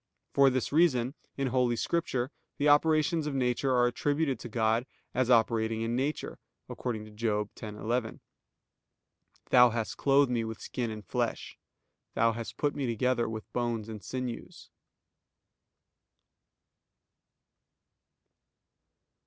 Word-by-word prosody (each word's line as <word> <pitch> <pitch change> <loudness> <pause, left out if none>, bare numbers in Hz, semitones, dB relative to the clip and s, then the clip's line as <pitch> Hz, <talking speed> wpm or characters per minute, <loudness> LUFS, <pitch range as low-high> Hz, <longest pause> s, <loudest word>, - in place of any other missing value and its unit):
For 140 -1 +6
this 130 -1 -1
reason 140 -6 +3 0.2
in 135 -1 0
Holy 125 -1 +2
Scripture 130 -2 -1 0.3
the 145 - +1
operations 155 +2 +3
of 145 - -3
nature 130 +1 +1
are 125 -1 +4
attributed 145 +3 0
to 120 - -8
God 115 +2 +1 0.3
as 130 -1 +1
operating 115 -1 +2
in 115 +1 -1
nature, 140 +4 -2 0.3
according 110 -4 -4
to 110 - -13
Job 105 -1 -1
10:11: 110 +2 -3 1.3
"Thou 125 -1 +8
hast 115 -1 -3
clothed 140 -1 +4
me 120 -2 +1
with 110 0 -6
skin 120 -3 -3
and 105 -2 -7
flesh: - - -2 0.6
Thou 115 +1 +4
hast 115 0 -6
put 145 0 0
me 135 -3 -2
together 120 +1 +1
with 110 -1 -7
bones 120 -3 -1
and 105 -3 -8
sinews." 125 0 -6
120 Hz, 120 wpm, -30 LUFS, 115-135 Hz, 1.3 s, Thou